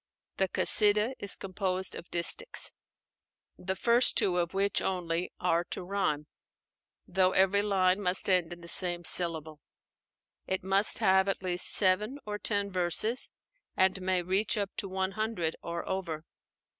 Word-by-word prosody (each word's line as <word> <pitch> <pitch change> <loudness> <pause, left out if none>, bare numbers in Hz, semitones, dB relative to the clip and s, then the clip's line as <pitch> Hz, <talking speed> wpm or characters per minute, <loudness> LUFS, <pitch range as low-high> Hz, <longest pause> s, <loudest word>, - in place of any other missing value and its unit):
The 190 -1 +1
Kasídah 210 +3 +2
is 200 - +1
composed 190 -1 -2
of 170 - -10
distichs, 175 - 0 0.8
the 190 +1 -4
first 235 +4 +4
two 180 -2 +2
of 170 -1 -1
which 195 +1 +1
only 175 -2 -2
are 170 -1 +1
to - - -6
rhyme; 175 -6 -2 0.8
though 185 0 +2
every 195 +1 +3
line 195 -1 +1
must 180 -1 0
end 180 -3 +1
in 175 0 -9
the 170 - -11
same 175 0 +3
syllable. 160 -3 +1 0.9
It 190 -1 -1
must 195 +2 +2
have 190 +1 +3
at 195 -1 -2
least 180 -1 +1
seven 210 +7 +2
or 210 0 -5
ten 200 -2 -1
verses, 185 +7 0 0.5
and 190 0 +2
may 185 -1 0
reach 195 +4 0
up 200 -1 -2
to 195 - -4
one 190 0 -2
hundred 215 -6 -2
or 170 0 -5
over. 170 -5 -4
190 Hz, 150 wpm, -29 LUFS, 175-200 Hz, 0.9 s, first